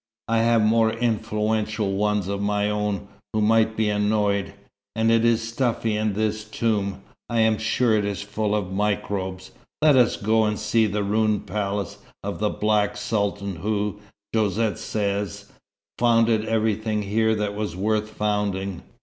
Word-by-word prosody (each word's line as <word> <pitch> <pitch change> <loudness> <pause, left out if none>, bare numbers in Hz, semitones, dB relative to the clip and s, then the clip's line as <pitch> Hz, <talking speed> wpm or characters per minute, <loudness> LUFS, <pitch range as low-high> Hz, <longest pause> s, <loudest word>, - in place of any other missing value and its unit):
I 115 0 +2
have 115 -1 +3
more 110 +1 +4
influential 110 -2 -1
ones 105 -1 0
of 100 0 -2
my 105 0 +1
own, 105 -2 -2 0.3
who 110 - +1
might 110 +1 +3
be 110 -1 +2
annoyed. 105 -1 +1 0.4
And 110 0 +2
it 115 0 +4
is 115 -1 +2
stuffy 115 -2 0
in 105 -1 0
this 110 +1 -1
tomb. 105 -3 -1 0.3
I 115 -1 +2
am 110 -1 +3
sure 110 +1 +2
it 105 - +1
is 100 -1 -3
full 105 +1 -1
of 95 -3 -2
microbes. 95 -2 -2 0.3
Let 150 -2 +5
us 125 -2 +4
go 110 +2 +2
and 105 0 0
see 110 +1 +2
the 105 0 -1
ruined 105 +1 +1
palace 100 0 -3 0.2
of 100 0 -4
the 105 0 +1
Black 105 -1 +1
Sultan 100 -3 -2
who, 105 +2 -2 0.3
Josette 110 0 +1
says, 100 -1 -3 0.5
founded 115 -2 +3
everything 110 -1 0
here 110 +2 +1
that 105 -1 -2
was 105 -4 -3
worth 105 +2 0
founding. 105 -3 -2
105 Hz, 155 wpm, -24 LUFS, 100-110 Hz, 0.5 s, Let